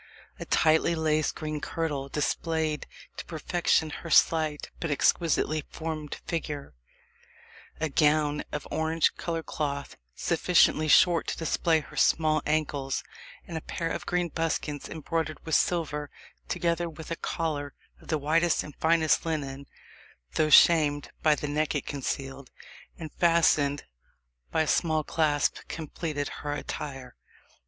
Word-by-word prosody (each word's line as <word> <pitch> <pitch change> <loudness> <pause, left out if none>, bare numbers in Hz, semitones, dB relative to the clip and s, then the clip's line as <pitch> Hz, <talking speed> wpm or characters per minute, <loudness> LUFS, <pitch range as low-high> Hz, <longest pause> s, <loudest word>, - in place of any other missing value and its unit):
A - - -5
tightly 160 +1 +3
laced 155 -1 +1
green 155 -1 -4
kirtle 145 -4 -3
displayed 155 +1 -1 0.3
to - - -6
perfection 160 -1 0
her 165 - -7
slight 155 -2 +3
but 165 - -3
exquisitely 155 +1 +2
formed 155 -2 -5
figure 150 -4 -4 1.1
A 160 - 0
gown 150 0 +2
of 150 - -5
orange 160 +1 +1
coloured 165 -1 -3
cloth, 140 -2 -4 0.2
sufficiently 155 0 +3
short 170 +2 +5
to - - -2
display 160 0 +1
her 150 - -14
small 155 -1 +3
ankles, 145 -3 -1 0.4
and 170 - -8
a 160 - -3
pair 165 +1 -3
of - - -5
green 175 -1 0
buskins, 155 -3 -2
embroidered 160 0 -3
with 160 - -4
silver, 150 -4 +1 0.4
together 170 - 0
with 160 0 -10
a - - 0
collar 150 -4 -3 0.3
of - - -17
the 155 - +1
whitest 160 +3 +2
and 150 - -10
finest 160 -1 +3
linen, 140 -4 -4 0.7
though 155 - +2
shamed 150 -2 +5
by 155 -2 +4
the 150 - -4
neck 150 +1 0
it 145 - -2
concealed, 135 -1 -4 0.5
and 160 -3 -7
fastened 160 -4 +3 0.7
by 160 - +2
a - - -4
small 155 -1 +2
clasp, 150 -2 +1
completed 155 -2 -4
her 145 0 -3
attire. 135 -3 -6
155 Hz, 135 wpm, -28 LUFS, 145-165 Hz, 1.1 s, short